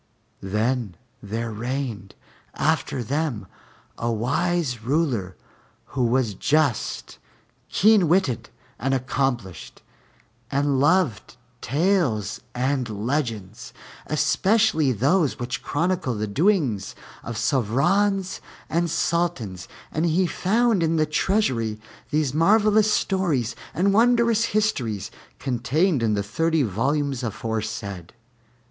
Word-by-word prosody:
Then 105 Hz, +1 st, -1 dB, 0.3 s
there 115 Hz, +3 st, -4 dB
reigned 115 Hz, -3 st, -4 dB, 0.4 s
after 125 Hz, -, 0 dB
them 135 Hz, -4 st, -2 dB, 0.5 s
a 120 Hz, 0 st, 0 dB
wise 140 Hz, +3 st, 0 dB
ruler, 120 Hz, -, -1 dB, 0.6 s
who 130 Hz, -3 st, 0 dB
was 120 Hz, -3 st, +1 dB
just, 140 Hz, +2 st, 0 dB, 0.5 s
keen 210 Hz, -3 st, +4 dB
witted, 160 Hz, -, +1 dB, 0.3 s
and 135 Hz, +1 st, +1 dB
accomplished, 125 Hz, -8 st, -3 dB, 0.7 s
and 140 Hz, 0 st, +1 dB
loved 145 Hz, -, +1 dB, 0.2 s
tales 145 Hz, -, 0 dB
and 130 Hz, -1 st, 0 dB, 0.2 s
legends, 115 Hz, -6 st, -3 dB, 0.3 s
especially 155 Hz, -, +2 dB
those 140 Hz, -, +2 dB
which 120 Hz, 0 st, -4 dB
chronicle 170 Hz, -5 st, -1 dB
the 105 Hz, 0 st, -2 dB
doings 130 Hz, -, +1 dB, 0.3 s
of 115 Hz, -1 st, -6 dB
Sovrans 175 Hz, -, +1 dB, 0.3 s
and 170 Hz, +1 st, +1 dB
Sultans, 160 Hz, -, -1 dB, 0.2 s
and 160 Hz, +3 st, 0 dB
he 175 Hz, +3 st, +2 dB
found 210 Hz, +6 st, +1 dB
in 165 Hz, 0 st, +1 dB
the 155 Hz, -1 st, +3 dB
treasury 130 Hz, -, 0 dB, 0.3 s
these 150 Hz, -3 st, 0 dB
marvelous 210 Hz, +6 st, +4 dB
stories 165 Hz, -, 0 dB, 0.2 s
and 195 Hz, +3 st, +1 dB
wondrous 235 Hz, 0 st, +4 dB
histories, 120 Hz, -, -1 dB, 0.3 s
contained 135 Hz, +5 st, 0 dB
in 110 Hz, -2 st, +1 dB
the 100 Hz, -, -1 dB
thirty 160 Hz, +8 st, +1 dB
volumes 135 Hz, +5 st, -1 dB
aforesaid. 110 Hz, -5 st, -4 dB
140 Hz, 100 wpm, -24 LUFS, 115-175 Hz, 0.7 s, keen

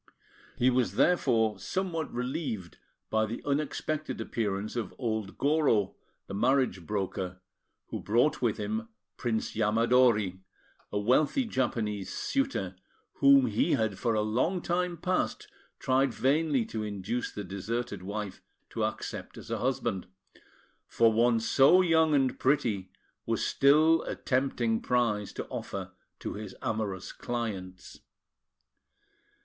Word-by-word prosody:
He 125 Hz, +1 st, +4 dB
was 125 Hz, -7 st, +1 dB
therefore 115 Hz, -, +3 dB
somewhat 165 Hz, -, -2 dB
relieved 125 Hz, -, -4 dB, 0.3 s
by 110 Hz, 0 st, +2 dB
the 115 Hz, -, -6 dB
unexpected 150 Hz, +1 st, -2 dB
appearance 105 Hz, -3 st, -2 dB
of 115 Hz, -6 st, -4 dB
old 110 Hz, -5 st, -3 dB
Goro, 140 Hz, -9 st, +2 dB, 0.3 s
the -, -, -8 dB
marriage 120 Hz, -, +1 dB
broker, 95 Hz, -3 st, -3 dB, 0.5 s
who -, -, -4 dB
brought 120 Hz, +8 st, +2 dB
with 115 Hz, -4 st, +1 dB
him 110 Hz, +2 st, -3 dB, 0.3 s
Prince 115 Hz, -3 st, -2 dB
Yamadori, 110 Hz, -2 st, +3 dB, 0.5 s
a -, -, -1 dB
wealthy 135 Hz, -, +2 dB
Japanese 110 Hz, -, -1 dB
suitor, 275 Hz, -, -1 dB, 0.4 s
whom 140 Hz, -1 st, +6 dB
he 110 Hz, -2 st, +1 dB
had 110 Hz, -7 st, 0 dB
for 115 Hz, +1 st, +1 dB
a 105 Hz, -, +2 dB
long 125 Hz, -, +1 dB
time 175 Hz, 0 st, -1 dB
past 185 Hz, -, -1 dB, 0.3 s
tried 130 Hz, -1 st, +1 dB
vainly 140 Hz, -2 st, +2 dB
to 110 Hz, -, -4 dB
induce 105 Hz, +3 st, -3 dB
the 105 Hz, -, -6 dB
deserted 100 Hz, +2 st, -4 dB
wife 100 Hz, 0 st, -5 dB, 0.3 s
to -, -, -2 dB
accept -, -, -4 dB
as -, -, -9 dB
a -, -, -1 dB
husband, 120 Hz, -7 st, -1 dB, 0.8 s
for 115 Hz, -1 st, +3 dB
one 115 Hz, +1 st, +3 dB
so 140 Hz, +10 st, +5 dB
young 160 Hz, -3 st, +4 dB
and 135 Hz, -2 st, +1 dB
pretty 110 Hz, -9 st, +1 dB, 0.4 s
was -, -, 0 dB
still 155 Hz, +4 st, +5 dB
a -, -, -3 dB
tempting 125 Hz, -4 st, 0 dB
prize 115 Hz, -5 st, 0 dB
to -, -, -5 dB
offer -, -, -5 dB, 0.3 s
to -, -, -5 dB
his 105 Hz, +1 st, -7 dB
amorous 100 Hz, -4 st, -2 dB
clients. 100 Hz, -7 st, -5 dB
115 Hz, 125 wpm, -29 LUFS, 105-140 Hz, 0.8 s, whom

